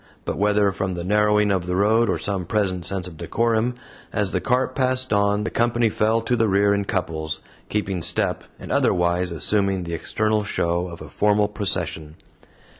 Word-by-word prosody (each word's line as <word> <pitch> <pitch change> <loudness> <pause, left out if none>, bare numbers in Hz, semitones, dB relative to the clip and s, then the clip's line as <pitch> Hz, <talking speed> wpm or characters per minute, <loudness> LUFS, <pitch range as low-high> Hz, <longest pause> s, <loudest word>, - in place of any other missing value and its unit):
But, - - -2
whether 105 0 +3
from 95 -1 -3
the 85 -1 -4
narrowing 105 +1 +3
of 90 -2 -1
the 90 - -1
road 110 +4 +3
or - - +1
some 95 -4 -3
present 95 -5 0
sense 95 -2 -2
of 80 -3 -11
decorum, 115 +7 0 0.4
as 105 -3 0
the 95 - -1
cart 125 +7 +1
passed 130 -2 +1
on, 100 0 +2
the - - -3
company 120 -1 +2
fell 110 +2 +1
to 120 +2 0
the 115 -2 +2
rear 100 +1 +3
in 100 0 -1
couples, 80 -5 -3 0.3
keeping 100 -4 -2
step, - - +1 0.2
and - - -8
otherwise 90 0 +1
assuming 95 +3 0
the 85 -1 -5
external 110 +5 0
show 85 -3 -1
of 85 -2 -10
a 75 - -11
formal 105 +3 +2
procession. 80 -6 -3
100 Hz, 185 wpm, -23 LUFS, 90-110 Hz, 0.4 s, whether